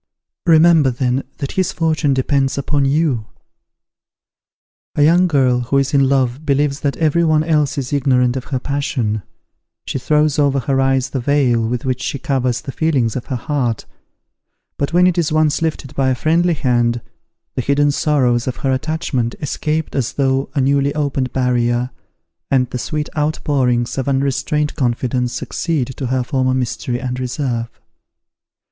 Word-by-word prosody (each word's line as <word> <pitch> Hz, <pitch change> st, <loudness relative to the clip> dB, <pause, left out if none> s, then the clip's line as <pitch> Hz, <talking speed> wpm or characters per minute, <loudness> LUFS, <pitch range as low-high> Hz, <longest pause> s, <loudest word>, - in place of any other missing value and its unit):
Remember 160 Hz, -3 st, +6 dB
then 125 Hz, +1 st, -1 dB
that 140 Hz, -2 st, -4 dB
his 185 Hz, -2 st, 0 dB
fortune 155 Hz, -4 st, +1 dB
depends 135 Hz, +1 st, +1 dB
upon 140 Hz, 0 st, 0 dB
you." 135 Hz, -6 st, +1 dB, 1.7 s
A 145 Hz, -, +3 dB
young 175 Hz, +4 st, +5 dB
girl 130 Hz, -6 st, +2 dB
who 125 Hz, +3 st, 0 dB
is 135 Hz, 0 st, 0 dB
in 135 Hz, -2 st, +4 dB
love 135 Hz, 0 st, +1 dB
believes 145 Hz, -1 st, +1 dB
that 140 Hz, -1 st, -1 dB
every 165 Hz, +1 st, +2 dB
one 155 Hz, -1 st, +3 dB
else 150 Hz, -3 st, +1 dB
is 135 Hz, 0 st, -3 dB
ignorant 130 Hz, -3 st, +2 dB
of 130 Hz, -, -4 dB
her 130 Hz, -, -2 dB
passion; 125 Hz, -6 st, -2 dB, 0.6 s
she -, -, -3 dB
throws 150 Hz, +3 st, +2 dB
over 140 Hz, -2 st, +2 dB
her 135 Hz, +2 st, +1 dB
eyes 135 Hz, -1 st, +1 dB
the 135 Hz, -, -2 dB
veil 120 Hz, -4 st, +2 dB
with 120 Hz, +1 st, -3 dB
which 130 Hz, 0 st, -1 dB
she 140 Hz, -, -2 dB
covers 130 Hz, -3 st, -1 dB
the 140 Hz, -, -6 dB
feelings 135 Hz, -8 st, 0 dB
of 125 Hz, -, -5 dB
her 130 Hz, -, -2 dB
heart; 125 Hz, -4 st, -2 dB, 0.9 s
but 140 Hz, -, -2 dB
when 175 Hz, +1 st, +4 dB
it 180 Hz, -1 st, +2 dB
is 165 Hz, -2 st, 0 dB
once 155 Hz, 0 st, +2 dB
lifted 155 Hz, -4 st, -3 dB
by 135 Hz, -1 st, +1 dB
a 130 Hz, -, +1 dB
friendly 165 Hz, +6 st, +2 dB
hand, 120 Hz, -3 st, +1 dB, 0.5 s
the -, -, -1 dB
hidden 140 Hz, +3 st, +2 dB
sorrows 130 Hz, -5 st, +1 dB
of 125 Hz, -, -2 dB
her 135 Hz, -, +2 dB
attachment 130 Hz, -4 st, -2 dB
escape 155 Hz, +2 st, -2 dB
as 130 Hz, -4 st, -1 dB
through 135 Hz, -1 st, 0 dB
a 140 Hz, -, +2 dB
newly 140 Hz, +1 st, +1 dB
opened 140 Hz, -4 st, -1 dB
barrier, 125 Hz, -1 st, 0 dB, 0.6 s
and 130 Hz, -2 st, +2 dB
the 125 Hz, -, -3 dB
sweet 150 Hz, +4 st, -3 dB
outpourings 135 Hz, -5 st, 0 dB
of 135 Hz, -, -1 dB
unrestrained 140 Hz, +2 st, 0 dB
confidence 125 Hz, -1 st, -1 dB
succeed 155 Hz, -4 st, -2 dB
to 135 Hz, -, -4 dB
her 130 Hz, 0 st, 0 dB
former 130 Hz, -1 st, 0 dB
mystery 125 Hz, -1 st, -2 dB
and 125 Hz, 0 st, -4 dB
reserve. 125 Hz, -2 st, -2 dB
135 Hz, 165 wpm, -18 LUFS, 125-150 Hz, 1.7 s, Remember